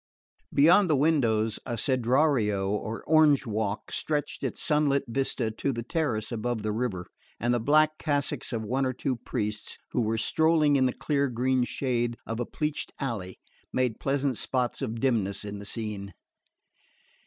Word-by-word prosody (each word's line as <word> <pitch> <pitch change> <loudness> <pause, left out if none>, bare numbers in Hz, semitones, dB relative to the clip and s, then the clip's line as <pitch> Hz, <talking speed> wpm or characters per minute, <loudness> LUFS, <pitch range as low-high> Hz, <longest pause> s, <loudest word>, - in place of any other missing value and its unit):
Beyond 175 +6 +5
the 155 - +4
windows, 115 -8 +2
a 120 - -4
cedrario 120 -5 +2
or 110 +2 -3
orange 155 -3 +5
walk 110 -2 -2
stretched 150 -2 -2
its - - -3
sunlit 150 -4 +2
vista 120 -2 -1
to 125 +5 -2
the 115 -2 -4
terrace 120 -6 -1
above 115 -1 -2
the 110 - -1
river; 105 -6 -2 0.3
and 120 +1 +1
the 120 - +2
black 155 +5 +3
cassocks 145 -4 -1
of 115 -3 -2
one 130 +5 0
or 130 -1 0
two 130 +1 -2
priests 105 -2 -4
who - - +1
were 110 0 0
strolling 155 +4 +3
in 130 -1 +4
the - - 0
clear 140 -2 0
green 125 +1 +1
shade 120 -3 -1
of 115 +1 -4
a 120 - -2
pleached 150 -1 -3
alley 105 -9 -4 0.3
made 125 -3 0
pleasant 135 -2 0
spots 125 -1 -1
of 115 -4 -3
dimness 110 -7 0
in 100 0 -6
the 100 - -8
scene. 100 -3 -5
125 Hz, 165 wpm, -27 LUFS, 110-140 Hz, 0.3 s, Beyond